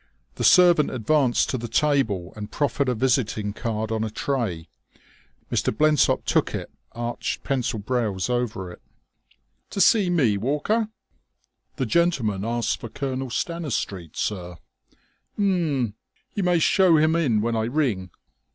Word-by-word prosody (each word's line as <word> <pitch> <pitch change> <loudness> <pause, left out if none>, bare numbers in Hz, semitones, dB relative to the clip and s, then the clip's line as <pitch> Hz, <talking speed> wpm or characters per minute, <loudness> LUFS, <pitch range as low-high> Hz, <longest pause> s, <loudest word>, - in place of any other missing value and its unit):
The - - -5
servant 175 -4 +6
advanced 130 +1 +1
to 130 - -2
the 120 - -5
table 115 - 0
and 105 -1 -7
proffered 140 -2 0
a 125 - 0
visiting 110 -4 0
card 110 0 -3
on 110 0 -1
a 110 - -2
tray. 105 - -2 0.8
Mr. - - +1
Blensop 150 +5 +2
took - - +1
it, - - -6 0.2
arched 120 0 -4
pencilled 120 -6 -2
brows 110 -7 -1
over 120 -7 -2
it. - - -13 0.9
"To - - -5
see 195 0 +5
me, 130 -13 +2
Walker?" 150 - 0 0.9
"The 130 - -1
gentleman 120 - +1
asked 115 +1 -1
for 115 - -7
Colonel 130 +2 -4
Stanistreet, 120 - -3
sir." 90 -4 -3 0.8
"H'm.... 165 - 0 0.4
You 205 - -2
may 180 -2 +3
show 175 +1 +4
him 155 +1 +3
in 135 -10 +2
when 115 +1 -1
I 110 0 0
ring." 120 - -1
125 Hz, 140 wpm, -24 LUFS, 110-155 Hz, 0.9 s, servant